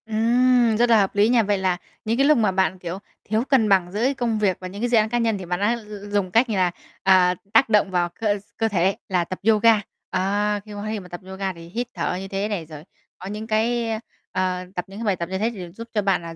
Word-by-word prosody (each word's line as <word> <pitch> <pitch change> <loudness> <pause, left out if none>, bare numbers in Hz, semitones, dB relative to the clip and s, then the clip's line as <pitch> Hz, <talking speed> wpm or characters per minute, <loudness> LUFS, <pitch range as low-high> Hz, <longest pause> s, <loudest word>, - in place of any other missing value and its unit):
Ừm, 235 +1 +3
rất 240 +1 +3
là 225 -2 +6
hợp 195 -1 0
lý 205 +2 +4
nha. 240 -2 +4
Vậy 205 0 +1
là 185 -2 0 0.3
những 225 +2 0
cái 275 - +4
lúc 305 0 +5
mà 215 -4 +2
bạn, 190 0 0
kiểu, 180 +1 -5 0.3
thiếu 220 +3 0
cân 240 -6 +4
bằng 185 -3 +3
giữa 235 +8 +1
công 235 -4 0
việc 195 -4 +1
và 185 - -6
những 200 +3 -8
cái 245 - 0
dự 235 - +4
án 215 0 +3
cá 240 - 0
nhân 225 -3 +1
thì 190 - -7
bạn 175 0 -2
đã 220 +4 +1 0.3
dùng 200 -3 0
cách 235 +4 +3
như 215 - -1
là, 180 -2 +2 0.3
à, 185 -2 +5 0.2
tác 265 - +5
động 210 -3 +3
vào 175 -1 +1
cơ 210 -2 +1
s - - -13 0.2
cơ 225 - +1
thể 195 -2 +1
là 180 -2 +2
tập 185 +2 -6
yoga. 225 0 +5 0.3
Ờ, 205 +2 0
khi 215 - -11
cơ 205 0 -6
thể 215 0 -2
mà 180 - -11
tập 175 -1 -8
yoga 190 0 -3
thì 170 -1 -12
hít 240 +6 -3
thở 170 -1 -2
như 195 - -6
thế 195 +1 -2
này 200 -6 -3
rồi, 155 -1 -10 0.3
có 185 - -9
những 210 +2 -6
cái, 230 +2 +1
ơ, 220 - -2 0.3
ờ, 185 -1 -1
tập 180 - -3
những 195 +2 -10
cái 230 - -4
bài 200 -3 +2
tập 170 -1 -5
như 190 - -2
thế 220 +4 0
thì 180 -5 -8
giúp 230 +6 -9
cho 210 - +1
bạn 195 -3 +1
là 165 -1 -8
205 Hz, 280 wpm, -23 LUFS, 185-225 Hz, 0.3 s, là